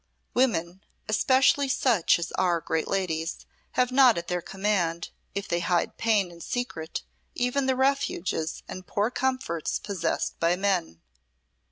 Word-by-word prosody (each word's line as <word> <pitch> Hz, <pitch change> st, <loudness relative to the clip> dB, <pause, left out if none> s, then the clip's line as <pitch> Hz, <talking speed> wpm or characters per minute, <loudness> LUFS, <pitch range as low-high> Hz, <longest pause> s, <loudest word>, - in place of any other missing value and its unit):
Women, 190 Hz, -8 st, +1 dB, 0.3 s
especially 265 Hz, +5 st, +3 dB
such 240 Hz, -9 st, +3 dB
as 170 Hz, 0 st, -4 dB
are 175 Hz, -2 st, +1 dB
great 160 Hz, 0 st, -2 dB
ladies, 165 Hz, -4 st, -2 dB, 0.3 s
have 250 Hz, 0 st, +2 dB
not 255 Hz, -4 st, +6 dB
at 170 Hz, -, -4 dB
their 180 Hz, 0 st, -1 dB
command, 185 Hz, -3 st, -1 dB, 0.2 s
if 200 Hz, 0 st, -3 dB
they 170 Hz, -, 0 dB
hide 175 Hz, 0 st, 0 dB
pain 210 Hz, -5 st, +2 dB
in 170 Hz, 0 st, -13 dB
secret, 205 Hz, -11 st, -4 dB, 0.3 s
even 250 Hz, +2 st, 0 dB
the 260 Hz, -, +2 dB
refuges 265 Hz, -, 0 dB
and 185 Hz, 0 st, -8 dB
poor 210 Hz, +4 st, 0 dB
comforts 255 Hz, -, -1 dB
possessed 190 Hz, -5 st, -2 dB
by 170 Hz, +1 st, +3 dB
men. 180 Hz, -, -1 dB
195 Hz, 140 wpm, -27 LUFS, 170-250 Hz, 0.3 s, not